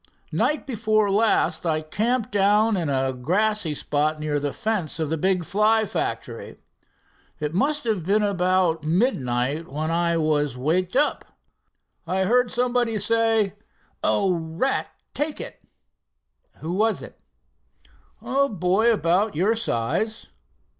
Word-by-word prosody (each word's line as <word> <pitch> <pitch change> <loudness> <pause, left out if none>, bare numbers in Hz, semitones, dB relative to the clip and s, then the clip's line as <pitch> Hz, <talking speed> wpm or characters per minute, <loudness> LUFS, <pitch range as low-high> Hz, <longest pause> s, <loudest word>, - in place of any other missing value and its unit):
"Night 300 - 0
before 215 -5 +1
last 195 -6 +2
I 155 -2 0
camped 220 +8 -1
down 210 +2 +3
in 170 -5 -1
a 135 -1 0
grassy 180 +5 0
spot 150 +2 -1
near 150 -1 -1
the 145 0 -2
fence 205 -7 -2
of 155 -1 -2
the - - +2
big 185 +1 +1
Fly 215 +3 +2
factory. - - -4 0.8
It 150 +1 -3
must 290 - +1
have 215 -7 -1
been 205 +5 +2
about 185 -4 +1
midnight 150 - 0
when 155 +3 -2
I 170 0 +1
was 150 -4 0
waked 175 - 0
up. 295 +2 0 0.7
I 190 +2 0
heard 240 +5 +3
somebody 245 -2 0
say: 225 -1 +2 0.5
'Oh, 170 -4 0
at 270 - 0 0.2
take 295 +1 -2
it!'" - - -8 1.0
"Who 160 - -4
was 215 0 +1
it?" - - -12 1.0
"A 275 +4 +1
boy 195 +4 +2
about 195 -1 +1
your 190 +8 +2
size." 215 - -1
190 Hz, 130 wpm, -24 LUFS, 160-220 Hz, 1.0 s, down